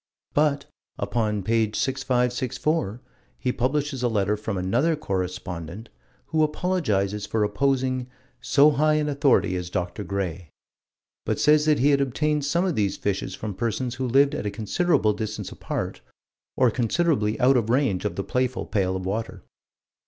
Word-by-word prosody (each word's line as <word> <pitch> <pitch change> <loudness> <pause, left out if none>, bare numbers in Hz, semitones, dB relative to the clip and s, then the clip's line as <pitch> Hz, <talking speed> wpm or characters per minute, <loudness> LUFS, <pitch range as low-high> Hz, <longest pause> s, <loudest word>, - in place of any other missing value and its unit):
But, 145 -1 +2 0.3
upon 105 -4 -1
page 110 +1 +1
6564, 125 -1 0 0.4
he 125 - -1
publishes 135 +2 -1
a 125 - +2
letter 105 -2 +1
from 105 -1 -4
another 120 - +1
correspondent, 90 - -4 0.4
who 160 -1 +1
apologizes 110 - 0
for 110 -1 0
opposing 130 +3 0 0.3
"so 145 +2 +5
high 155 +2 +3
an 150 -1 +1
authority 140 -9 +2
as 90 -1 -4
Dr. 90 +3 -3
Gray," 90 -3 -4 0.7
but - - -1
says 150 0 +4
that 150 -1 +4
he 140 +4 +4
had 140 -1 +3
obtained 150 +2 0
some 170 +6 +1
of 185 - 0
these 100 -6 0
fishes 95 -2 -2
from 105 -2 -5
persons 120 +4 -2
who 130 - 0
lived 140 +4 +4
at 105 - -3
a - - +1
considerable 110 - +1
distance 110 -1 -5
apart, - - -4 0.6
or 125 -3 +4
considerably 120 -2 +1
out 130 +2 +5
of 115 -3 +1
range 120 -8 +1
of 105 - -2
the 100 - -2
playful 125 +2 -1
pail 95 -2 0
of 95 0 -4
water. 95 -2 -4
120 Hz, 155 wpm, -25 LUFS, 100-140 Hz, 0.7 s, so